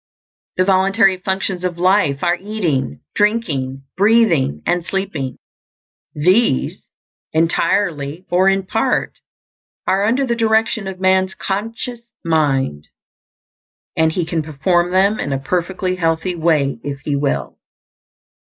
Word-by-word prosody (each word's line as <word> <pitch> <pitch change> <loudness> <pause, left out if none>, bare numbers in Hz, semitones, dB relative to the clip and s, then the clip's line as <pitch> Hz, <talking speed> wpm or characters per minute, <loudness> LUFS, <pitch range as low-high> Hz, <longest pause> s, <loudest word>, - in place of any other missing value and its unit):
The 185 - +3
voluntary 195 +1 +3
functions 190 -1 -2
of 180 -2 -2
life 180 -6 +2
are 175 0 +3
eating, 170 - -2
drinking, 150 - 0
breathing, 190 - +3
and 175 -1 +1
sleeping. 165 -8 -3 0.8
These, 180 - +2 0.5
entirely 165 -1 0
or 185 +2 +4
in 195 0 0
part, - - 0 0.7
are 195 +2 +2
under 250 +5 +2
the 235 -2 0
direction 220 -2 +1
of 190 -1 -6
man's 190 0 +2
conscious 225 +5 -4 0.3
mind; 135 - 0 1.1
and 160 0 +3
he 170 +1 -1
can 165 -1 -1
perform 165 +4 0
them 195 +3 +2
in 140 - -2
a - - 0
perfectly 185 +5 -2
healthy 165 +1 0
way 155 -6 +1
if 140 -1 -5
he 145 0 -2
will. 140 0 -2
180 Hz, 120 wpm, -18 LUFS, 150-195 Hz, 1.1 s, or